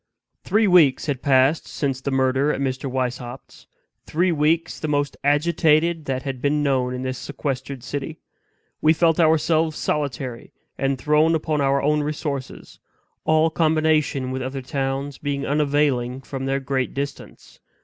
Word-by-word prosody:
Three 215 +1 +2
weeks 170 -9 +5
had 140 -5 -2
passed 135 +3 +3
since 135 -3 -3
the 140 - -2
murder 135 +2 +2
at - - -3
Mr. 135 0 -2
Weishaupt's 125 0 -5 0.4
three 175 +3 +1
weeks 160 +1 +1
the 155 - -3
most 145 -1 0
agitated 155 +2 +2
that 130 -1 -2
had 135 -3 -5
been 145 +1 +1
known 130 -3 0
in 125 - -5
this 130 -1 -3
sequestered 135 -2 -5
city. 145 +3 -5 0.6
We 155 +1 +5
felt 165 0 +2
ourselves 160 -1 +2
solitary, 130 -4 -3 0.2
and 135 0 -1
thrown 150 +5 +3
upon 155 -1 -1
our 140 0 +2
own 150 +1 +2
resources; 145 -2 -5 0.5
all 155 +1 +3
combination 155 -5 +1
with 130 0 -3
other 130 +1 -4
towns 135 0 -3
being 140 -1 -3
unavailing 140 -4 +1
from 135 +2 -5
their 135 0 0
great 135 -1 -2
distance. 140 0 -7
140 Hz, 150 wpm, -22 LUFS, 130-155 Hz, 0.6 s, weeks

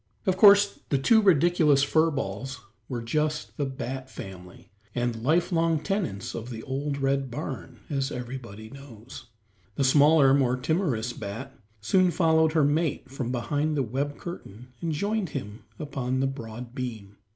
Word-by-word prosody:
Of 190 -2 +2
course 200 +1 +6
the 140 - +2
two 220 - +4
ridiculous 165 -6 +4
fur 160 +3 +3
balls 135 0 -4 0.3
were 120 -3 -4
just 150 +5 -1
the 145 - -1
bat 130 0 -5
family, 90 -5 -11 0.2
and 120 -2 -1
lifelong 165 - +2
tenants 170 - -3
of 115 +2 -6
the 110 -2 -7
old 140 +2 -3
red 135 -1 0
barn, 130 -3 -6
as 135 -2 -2
everybody 120 -4 -7
knows. 130 -4 -12 0.5
The 140 - 0
smaller, 145 +1 +6
more 130 -3 +2
timorous 125 - -1
bat, 115 +8 -7 0.3
soon 185 - +3
followed 160 -3 +3
her 160 -2 +3
mate 145 -3 0
from 130 -3 -3
behind 145 +5 -1
the 135 - +2
web 140 +5 -3
curtain 125 - -9
and 165 - -1
joined 200 +4 -1
him 105 -3 -8
upon 130 -3 -3
the 135 - +2
broad 120 -3 -6
beam. 110 -6 -6
135 Hz, 150 wpm, -27 LUFS, 120-155 Hz, 0.5 s, course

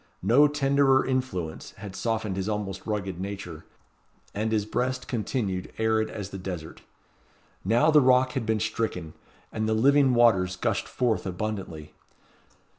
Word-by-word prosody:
No 125 +9 +6
tenderer 140 -2 +3
influence 125 -12 -3
had 100 -3 -8
softened 110 -3 -2
his 95 +2 -2
almost 105 -2 -4
rugged 100 -4 -3
nature; 95 -4 -6 0.7
and 110 +2 -2
his 105 -2 +1
breast 125 +4 -2
continued 105 -5 -2
arid 110 0 +1
as 100 -2 -6
the 95 - -6
desert. 90 -4 -7 0.8
Now 120 +11 +3
the 150 -1 +6
rock 130 0 +4
had 130 -4 -2
been 110 -1 +1
stricken, 110 -7 -3 0.4
and 110 0 -1
the 110 - +2
living 135 +2 +4
waters 95 -6 +4
gushed - - -1
forth 120 -5 -1
abundantly. 90 -5 -5
110 Hz, 140 wpm, -26 LUFS, 95-125 Hz, 0.8 s, No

